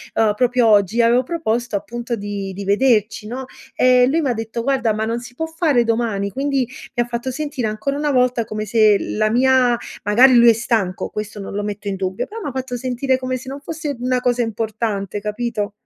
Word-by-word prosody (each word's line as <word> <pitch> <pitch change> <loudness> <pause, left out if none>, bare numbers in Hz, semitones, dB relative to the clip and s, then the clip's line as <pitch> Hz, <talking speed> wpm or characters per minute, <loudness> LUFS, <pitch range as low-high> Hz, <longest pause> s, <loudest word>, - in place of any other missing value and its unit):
Uhm, 220 -2 +3
proprio 245 +1 +2
oggi 210 +1 +3
avevo 235 +2 +4
proposto, 245 -6 -2
appunto 235 +4 -4
di 200 -2 -5
di 200 +2 -6
vederci, 210 0 +2
no? 255 +4 -5 0.3
E 250 0 +5
lui 315 +5 +1
m'ha 270 -5 0
detto: 225 +1 -4
"Guarda, 260 -3 +1
ma 215 +1 -2
non 230 +2 -2
si 245 0 -12
può 320 - -2
fare 320 -6 +1
domani?" 225 -4 -1
Quindi 270 +1 -1 0.3
mi 240 - +2
ha - - -9
fatto 240 +1 -4
sentire 270 -3 -3
ancora 215 +7 -2
una 295 0 0
volta 250 -3 +2
come 215 0 -4
se 215 -1 +4
la 215 0 -1
mia 250 0 +3 0.3
magari 245 +6 +6
lui 235 0 +7
è - - +7
stanco, 220 -5 -1
questo 210 0 -6
non 195 - -7
lo 205 - -2
metto 205 0 -5
in 195 -1 -2
dubbio, 190 0 -2
però 450 +2 -8
m'ha 290 - -4
fatto 260 -1 -4
sentire 255 +1 -1
come 255 0 -2
se 255 - -12
non 275 +2 -6
fosse 300 -1 -4
una 250 +1 0
cosa 245 -1 +1
importante, 220 -3 -2
capito? 210 0 -3
235 Hz, 210 wpm, -20 LUFS, 215-255 Hz, 0.3 s, lui